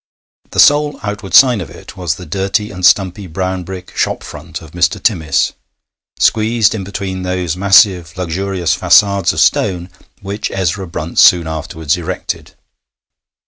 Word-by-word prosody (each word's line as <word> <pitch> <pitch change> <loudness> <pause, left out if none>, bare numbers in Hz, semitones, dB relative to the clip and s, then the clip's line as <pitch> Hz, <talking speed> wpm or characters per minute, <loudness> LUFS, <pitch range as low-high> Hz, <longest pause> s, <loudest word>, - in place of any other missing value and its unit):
The - - -4
sole 145 0 +4
outward 105 -2 -4
sign 125 -6 +6
of 85 - -7
it - - -13
was 90 -3 -2
the 90 0 -10
dirty 100 +2 -2
and 90 -2 -9
stumpy 95 +2 +2
brown 95 +2 -3
brick 90 0 -9
shop - - -1
front 75 +1 -9
of 80 -3 -14
Mr. 90 +1 0
Timmis, 80 -9 0 0.6
squeezed 110 0 +2
in 105 -3 -4
between 95 -1 -5
those 90 -3 -2
massive 95 -2 +3
luxurious 90 -1 -2
façades 95 +1 +3
of 80 - -4
stone 90 +2 +1 0.3
which 100 +2 -4
Ezra 95 0 -2
Brunt 85 0 -4
soon 85 -2 +6
afterwards 80 0 -3
erected. 85 - -6
95 Hz, 145 wpm, -15 LUFS, 85-100 Hz, 0.6 s, sign